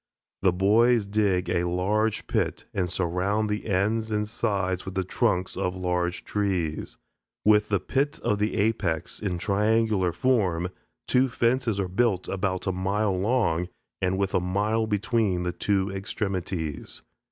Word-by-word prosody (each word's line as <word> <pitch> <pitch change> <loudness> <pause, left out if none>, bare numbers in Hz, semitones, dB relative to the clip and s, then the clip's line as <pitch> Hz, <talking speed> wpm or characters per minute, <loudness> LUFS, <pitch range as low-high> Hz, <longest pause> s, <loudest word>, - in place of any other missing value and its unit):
The 95 - +4
boys 110 +5 +4
dig 100 -3 +1
a 90 0 +1
large 105 +5 0
pit - - -1
and 90 -2 0
surround 95 +4 0
the 105 +1 -3
ends 110 +3 +1
and 105 -1 -1
sides 95 -4 -1
with 95 -1 -7
the 95 - +1
trunks 95 -1 0
of 90 -1 -1
large 90 -1 -1
trees. 95 -7 -2 0.5
With 105 0 +4
the 100 -2 +2
pit 140 +9 -1
of 105 - +1
the 105 +1 0
apex, 95 -6 0
in 95 -4 -2
triangular 105 -1 +2
form, 90 -4 +1 0.4
two 130 +1 +3
fences 115 -2 +1
are 95 - 0
built 95 0 +1
about 95 -1 -2
a 95 - +1
mile 95 +2 0
long, 90 -4 +1 0.3
and 95 0 +1
with 100 -1 -1
a - - +3
mile 105 +5 0
between 105 -3 +1
the 90 - -1
two 100 -1 0
extremities. 95 -5 -4
100 Hz, 150 wpm, -26 LUFS, 90-110 Hz, 0.5 s, The